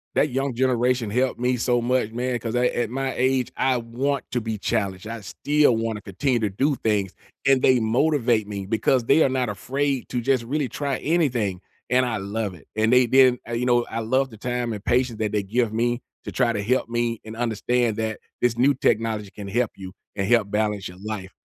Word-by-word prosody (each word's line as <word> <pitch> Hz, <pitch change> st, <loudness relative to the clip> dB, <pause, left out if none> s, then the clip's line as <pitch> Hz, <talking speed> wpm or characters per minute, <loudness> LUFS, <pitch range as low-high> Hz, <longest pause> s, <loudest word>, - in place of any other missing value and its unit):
That 150 Hz, -, +3 dB
young 135 Hz, -1 st, -2 dB
generation 125 Hz, -2 st, +1 dB
helped 125 Hz, +3 st, 0 dB
me 125 Hz, 0 st, +1 dB
so 120 Hz, 0 st, +1 dB
much, 125 Hz, -2 st, 0 dB
man, 120 Hz, +1 st, -2 dB
'cause 115 Hz, +1 st, -4 dB
at 125 Hz, 0 st, +2 dB
at 120 Hz, -2 st, -1 dB
my 135 Hz, +1 st, -2 dB
age, 130 Hz, -1 st, +1 dB
I 130 Hz, -1 st, +2 dB
want 125 Hz, +4 st, -2 dB
to 120 Hz, -1 st, 0 dB
be 110 Hz, -1 st, -3 dB
challenged. 100 Hz, -2 st, -2 dB
I 115 Hz, -1 st, -6 dB
still 145 Hz, +5 st, +2 dB
want 115 Hz, -1 st, -2 dB
to 105 Hz, -, -10 dB
continue 120 Hz, +7 st, -1 dB
to 105 Hz, -2 st, 0 dB
do 135 Hz, +9 st, +1 dB
things, 105 Hz, -5 st, 0 dB, 0.3 s
and 135 Hz, -1 st, +4 dB
they 130 Hz, -2 st, +5 dB
motivate 120 Hz, -2 st, +2 dB
me 100 Hz, -2 st, -5 dB
because 115 Hz, +4 st, +1 dB
they 160 Hz, -, +4 dB
are 135 Hz, -, +3 dB
not 130 Hz, -3 st, 0 dB
afraid 135 Hz, +6 st, -2 dB
to 125 Hz, -1 st, -2 dB
just 130 Hz, 0 st, +1 dB
really 140 Hz, +1 st, -1 dB
try 140 Hz, 0 st, -2 dB
anything, 125 Hz, -, 0 dB, 0.3 s
and 125 Hz, 0 st, +3 dB
I 115 Hz, -3 st, -1 dB
love 100 Hz, +1 st, -3 dB
it, 75 Hz, -, -18 dB
and 110 Hz, +2 st, +2 dB
they 125 Hz, 0 st, +6 dB
didn't 130 Hz, -1 st, +5 dB
uh, 120 Hz, -, -5 dB
you 120 Hz, +1 st, -1 dB
know, 120 Hz, -1 st, +3 dB
I 115 Hz, -, -3 dB
love 130 Hz, +4 st, +1 dB
the 110 Hz, -, -12 dB
time 120 Hz, 0 st, -2 dB
and 105 Hz, -, -7 dB
patience 120 Hz, -1 st, +1 dB
that 105 Hz, -2 st, -1 dB
they 105 Hz, -1 st, 0 dB
give 115 Hz, +2 st, 0 dB
me 120 Hz, +2 st, 0 dB, 0.2 s
to -, -, -6 dB
try 115 Hz, -, +2 dB
to 100 Hz, -2 st, -2 dB
help 125 Hz, +1 st, 0 dB
me 120 Hz, -1 st, -1 dB
and 110 Hz, 0 st, -8 dB
understand 120 Hz, 0 st, 0 dB
that 110 Hz, -1 st, -2 dB, 0.2 s
this 120 Hz, -1 st, +2 dB
new 140 Hz, +3 st, +4 dB
technology 110 Hz, -4 st, 0 dB
can 100 Hz, -1 st, -8 dB
help 120 Hz, +3 st, 0 dB
you 95 Hz, -1 st, -9 dB, 0.2 s
and 95 Hz, -1 st, -1 dB
help 115 Hz, -4 st, +3 dB
balance 105 Hz, -2 st, -1 dB
your 90 Hz, -, -11 dB
life. 100 Hz, -3 st, -5 dB
120 Hz, 220 wpm, -24 LUFS, 110-130 Hz, 0.3 s, they